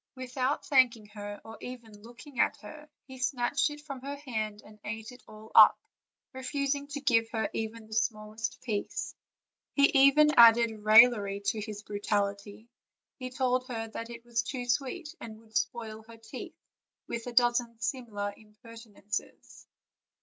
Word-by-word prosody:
Without 255 Hz, +2 st, -2 dB
thanking 250 Hz, -6 st, +3 dB
her, 205 Hz, -1 st, -8 dB
or 225 Hz, 0 st, -10 dB
even 230 Hz, -4 st, -10 dB
looking 240 Hz, +4 st, -12 dB
at -, -, +2 dB
her, 300 Hz, +7 st, -12 dB, 0.2 s
he 260 Hz, -1 st, -11 dB
snatched 255 Hz, +3 st, +1 dB
it 295 Hz, 0 st, -8 dB
from 275 Hz, -4 st, -8 dB
her 280 Hz, +2 st, -5 dB
hand 220 Hz, -7 st, -4 dB
and 210 Hz, 0 st, -16 dB
ate 220 Hz, +1 st, -6 dB
it 250 Hz, 0 st, -14 dB
all 215 Hz, +1 st, -13 dB
up, -, -, +9 dB, 0.6 s
refusing 280 Hz, +2 st, -2 dB
to 285 Hz, 0 st, -5 dB
give 230 Hz, -5 st, +2 dB
her 220 Hz, -1 st, -2 dB
even 225 Hz, 0 st, -4 dB
the 220 Hz, -, -12 dB
smallest 215 Hz, 0 st, -2 dB
piece. 215 Hz, -5 st, -3 dB, 0.6 s
He 280 Hz, 0 st, +5 dB
even 300 Hz, +2 st, +6 dB
added 235 Hz, 0 st, +8 dB
raillery 215 Hz, -2 st, +6 dB
to 205 Hz, +2 st, -1 dB
his 210 Hz, -1 st, -7 dB
brutality; 205 Hz, +1 st, -3 dB, 0.5 s
he 255 Hz, -1 st, -5 dB
told 255 Hz, 0 st, 0 dB
her 225 Hz, -3 st, -4 dB
that 230 Hz, +1 st, -7 dB
it 235 Hz, 0 st, -10 dB
was 235 Hz, -1 st, 0 dB
too 250 Hz, +1 st, -5 dB
sweet, 285 Hz, +6 st, -2 dB
and 220 Hz, -2 st, -9 dB
would 220 Hz, -1 st, -22 dB
spoil 225 Hz, -3 st, -2 dB
her 230 Hz, 0 st, -13 dB
teeth, 225 Hz, -, -9 dB, 0.5 s
with 235 Hz, +1 st, -5 dB
a -, -, -4 dB
dozen 240 Hz, -1 st, +2 dB
similar 220 Hz, -5 st, -3 dB
impertinences. 215 Hz, -1 st, -9 dB
230 Hz, 155 wpm, -29 LUFS, 215-255 Hz, 0.6 s, up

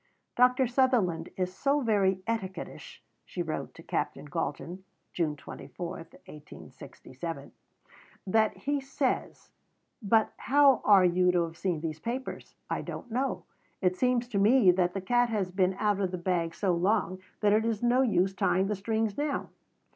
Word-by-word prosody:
"Dr. 250 Hz, +2 st, +4 dB
Sutherland 245 Hz, -9 st, +1 dB
is 185 Hz, -1 st, -2 dB
so 280 Hz, +9 st, +1 dB
very 195 Hz, -5 st, +1 dB
etiquettish," 195 Hz, -6 st, -5 dB, 0.2 s
she -, -, -4 dB
wrote -, -, -5 dB
to -, -, -12 dB
Captain -, -, -3 dB
Galton 180 Hz, +3 st, -4 dB, 0.3 s
(June 160 Hz, -4 st, -1 dB
24, 145 Hz, +4 st, -8 dB
1867), 150 Hz, -1 st, -10 dB, 0.7 s
"that 220 Hz, +2 st, +2 dB
he 285 Hz, 0 st, -1 dB
says, 270 Hz, -1 st, -3 dB, 0.5 s
But 220 Hz, +1 st, +2 dB
how 275 Hz, 0 st, +4 dB
are 195 Hz, -3 st, +6 dB
you 180 Hz, +1 st, +3 dB
to 175 Hz, -1 st, +3 dB
have 165 Hz, -1 st, -6 dB
seen 175 Hz, -3 st, -2 dB
these 160 Hz, -1 st, -4 dB
papers? 245 Hz, +8 st, -5 dB
I -, -, -2 dB
don't 240 Hz, -, -8 dB
know. 260 Hz, +4 st, -1 dB, 0.4 s
It 180 Hz, -1 st, +1 dB
seems 250 Hz, +2 st, +1 dB
to 205 Hz, -5 st, -1 dB
me 215 Hz, -1 st, +6 dB
that 180 Hz, 0 st, 0 dB
the 195 Hz, -, -2 dB
cat 240 Hz, +5 st, +2 dB
has 200 Hz, -5 st, -1 dB
been 185 Hz, 0 st, +1 dB
out 205 Hz, 0 st, 0 dB
of 190 Hz, -2 st, 0 dB
the 180 Hz, -, -4 dB
bag 170 Hz, -2 st, -1 dB
so 195 Hz, -3 st, 0 dB
long 185 Hz, +1 st, 0 dB, 0.2 s
that 205 Hz, -1 st, +4 dB
it 220 Hz, +1 st, +3 dB
is 225 Hz, -1 st, -2 dB
no 245 Hz, +2 st, +4 dB
use 195 Hz, -6 st, +2 dB
tying 190 Hz, 0 st, +1 dB
the 210 Hz, +1 st, -1 dB
strings 220 Hz, +1 st, -1 dB
now. 290 Hz, +1 st, -2 dB
200 Hz, 160 wpm, -29 LUFS, 180-240 Hz, 0.7 s, are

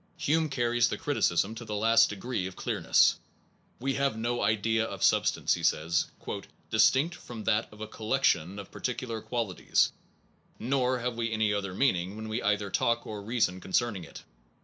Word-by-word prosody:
Hume 160 Hz, +1 st, +1 dB
carries 120 Hz, -3 st, +2 dB
the -, -, -3 dB
criticism 105 Hz, -, +1 dB
to 115 Hz, +1 st, -8 dB
the 105 Hz, -2 st, -5 dB
last 115 Hz, +2 st, +4 dB
degree 105 Hz, -1 st, -3 dB
of 95 Hz, -, -9 dB
clearness. -, -, +2 dB, 0.6 s
We 135 Hz, +2 st, -1 dB
have 135 Hz, -4 st, 0 dB
no 120 Hz, +2 st, -1 dB
idea 110 Hz, +2 st, +1 dB
of -, -, -5 dB
substance, -, -, +3 dB
he -, -, -3 dB
says, 80 Hz, +2 st, +1 dB, 0.6 s
distinct 130 Hz, +9 st, +4 dB
from 120 Hz, -10 st, -9 dB
that 110 Hz, 0 st, +1 dB
of 105 Hz, 0 st, -14 dB
a 110 Hz, -, -4 dB
collection 110 Hz, -, 0 dB
of 100 Hz, -2 st, -9 dB
par -, -, -11 dB
ticular 120 Hz, -3 st, -3 dB
qualities, 115 Hz, -7 st, 0 dB, 0.7 s
nor 130 Hz, 0 st, 0 dB
have 120 Hz, -1 st, -3 dB
we 115 Hz, -1 st, -1 dB
any 110 Hz, -1 st, +1 dB
other 100 Hz, -2 st, -3 dB
mean 135 Hz, -2 st, +3 dB
ing 90 Hz, +3 st, -5 dB
when 110 Hz, 0 st, -6 dB
we 110 Hz, +3 st, -2 dB
either 105 Hz, -1 st, 0 dB
talk 115 Hz, +4 st, +1 dB
or 105 Hz, -1 st, -6 dB
reason 100 Hz, -4 st, 0 dB
concerning 100 Hz, -1 st, 0 dB
it. 80 Hz, -, -11 dB
110 Hz, 175 wpm, -29 LUFS, 105-120 Hz, 0.7 s, last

